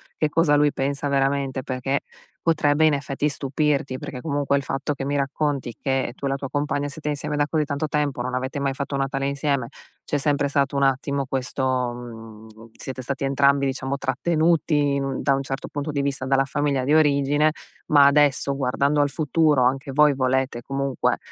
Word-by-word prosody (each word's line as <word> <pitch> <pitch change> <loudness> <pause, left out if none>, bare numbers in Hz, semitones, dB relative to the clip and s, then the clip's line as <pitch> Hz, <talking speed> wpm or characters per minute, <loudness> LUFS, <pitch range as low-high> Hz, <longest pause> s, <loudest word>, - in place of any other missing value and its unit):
che 155 - 0
cosa 150 -1 +3
lui 145 0 +4
pensa 140 +2 -2
veramente, 135 -1 0
perché, 130 +2 -2 0.4
potrebbe 155 -1 +3
in 150 - +3
effetti 140 +1 -1
stupirti, 140 -1 -1
perché 125 - -7
comunque 140 -1 0
il 140 - -2
fatto 140 +2 -2
che 135 - -5
mi 145 - -1
racconti, 140 -2 -1
che 135 -3 -1
tu 140 - -6
e - - +1
la - - 0
tua 135 -1 -6
compagna 145 0 -1
siete 150 +1 -7
insieme 150 0 -2
da 145 - +2
così 155 -1 0
tanto 145 +1 -2
tempo, 145 -4 -1
non 125 - -4
avete 130 +3 -2
mai 140 -1 0
fatto 140 0 -4
un 135 - 0
Natale 135 0 -1
insieme, 140 -3 -1 0.4
c'è 145 - -1
sempre 145 0 +1
stato 140 0 0
un 140 - +1
attimo 135 0 0
questo 130 0 -3 0.3
mhmm, 115 -2 -10 0.3
siete 130 -1 -7
stati 135 +1 -3
entrambi, 140 0 +3
diciamo, 135 +1 -2
trattenuti 150 +1 +1
in 140 - -1
un 135 -1 -3
da 135 - +3
un 135 - -2
certo 135 +1 -5
punto 145 +1 -4
di 140 - -1
vista, 140 -1 -2
dalla 135 +1 +2
famiglia 140 -1 0
di 145 +4 +2
origine, 145 0 +3 0.4
ma 145 -2 +7
adesso 140 -1 +3
guardando 140 +2 +1
al 145 - +2
futuro, 155 -2 +2
anche 135 +2 +1
voi 150 0 +4
volete, 130 -2 0
comunque, 135 0 -1
140 Hz, 195 wpm, -23 LUFS, 135-145 Hz, 0.4 s, ma